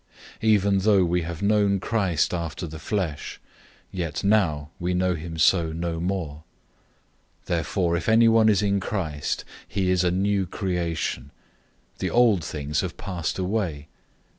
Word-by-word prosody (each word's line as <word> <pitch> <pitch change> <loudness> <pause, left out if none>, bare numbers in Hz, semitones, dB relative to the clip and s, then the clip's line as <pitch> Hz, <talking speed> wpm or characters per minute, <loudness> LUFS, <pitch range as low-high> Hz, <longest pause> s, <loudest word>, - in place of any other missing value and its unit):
Even 100 -3 +3
though 100 -2 +4
we 90 +1 +1
have 85 +2 -5
known 100 -1 +3
Christ 95 -8 0
after 85 -1 -3
the 80 -1 -8
flesh, 85 -4 -3 0.5
yet 85 -4 -3
now 85 -8 +2
we 90 +1 -1
know 90 0 +2
him 80 -1 -6
so 80 0 +3
no 85 0 -3
more. 85 -4 -2 1.1
005:017 - - -36
Therefore 85 +1 0
if 85 - -2
anyone 115 0 +5
is 105 -1 +3
in 100 -1 +2
Christ, 80 -8 -3 0.2
he 95 -2 0
is 90 -1 +2
a 90 - +3
new 95 +1 +1
creation. 85 - -2 0.7
The - - -1
old 115 -8 +4
things 75 -1 -2
have 95 - -5
passed 90 -5 -3
away. 90 -6 -2
90 Hz, 145 wpm, -25 LUFS, 80-100 Hz, 1.1 s, anyone